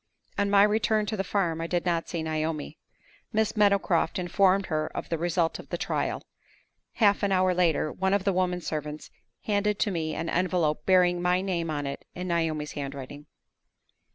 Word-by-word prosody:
On 200 0 0
my 200 0 +6
return 215 0 +2
to 210 - -2
the 195 - -1
farm, 175 -5 -1
I 165 - -2
did 175 0 -1
not 170 -2 0
see 170 -2 -3
Naomi. 155 -1 -3 0.5
Miss 220 0 0
Meadowcroft 200 -5 +2
informed 190 +2 +2
her 155 -2 -1
of - - -5
the 165 - -1
result 170 -1 0
of - - -11
the - - -2
trial. - - -2 0.7
Half 205 -3 +3
an 200 -1 +1
hour 185 -1 +3
later, 165 -4 +1
one 190 +1 +1
of 200 - 0
the 195 -1 +1
women 180 -1 0
servants 150 -1 -5 0.3
handed 210 0 0
to 205 - 0
me 160 -3 -2
an 165 - -3
envelope 165 -4 0
bearing 180 -2 +4
my 180 +1 +2
name 175 -4 -2
on 145 -2 -2
it 140 - -5
in 180 0 -5
Naomi's 160 -3 -1
handwriting. 140 +1 -7
180 Hz, 180 wpm, -27 LUFS, 160-195 Hz, 0.7 s, my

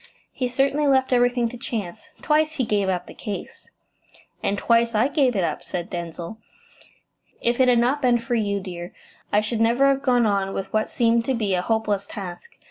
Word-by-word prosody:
"He 255 - -2
certainly 275 +4 +1
left 265 -1 +3
everything 245 -1 +3
to 245 - -9
chance. 230 - -5 0.2
Twice 310 +1 +2
he 265 - -1
gave 205 -3 +1
up 180 -1 -1
the - - -11
case.". 205 -2 -7 0.7
"And 200 - 0
twice 230 +1 +2
I 220 +5 +4
gave 275 -5 +2
it 190 - +1
up," 155 -3 -2
said 175 -1 -5
Denzil. 170 +4 -6 1.0
"If 235 +1 0
it 260 - +5
had 245 -1 +5
not 250 +5 +2
been 245 -3 +4
for 235 +1 -4
you, 205 -3 0
dear, 175 -1 -8 0.4
I 210 - +4
should 220 +1 -2
never 235 +4 +3
have 275 0 +1
gone 250 -4 +3
on 195 -2 0
with 195 0 -5
what 215 0 +1
seemed 230 -1 +2
to 265 - 0
be 210 -4 -1
a 180 - +1
hopeless 210 -1 -1
task. 200 - -8
230 Hz, 200 wpm, -23 LUFS, 200-255 Hz, 1.0 s, it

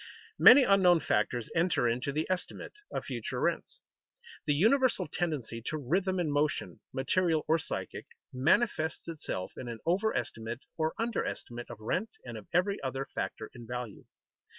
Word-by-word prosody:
Many 270 +2 +10
unknown 190 -5 +5
factors 110 +2 0
enter 165 -7 +2
into 125 +4 -1
the 155 +3 -1
estimate 185 -1 -3 0.2
of - - -3
future - - -4
rents. - - -1 0.7
The 145 - +3
universal 250 - +3
tendency 145 -9 -2
to 155 - -1
rhythm 185 +7 0
in 160 -4 0
motion 145 +1 0
(material 160 +4 +1
or 160 +1 +3
psychic) - - -5 0.3
manifests 160 - +1
itself 150 - -4
in 125 - -7
an 115 -1 -5
overestimate 155 - -1
or 160 -1 -1
underestimate 120 - -3
of 120 -3 -8
rent 120 - -1 0.2
and 120 -2 -7
of 110 -2 -9
every 185 +3 +1
other 135 0 -3
factor - - -4
in 120 -2 -11
value. 125 -3 -6
155 Hz, 150 wpm, -30 LUFS, 120-185 Hz, 0.7 s, Many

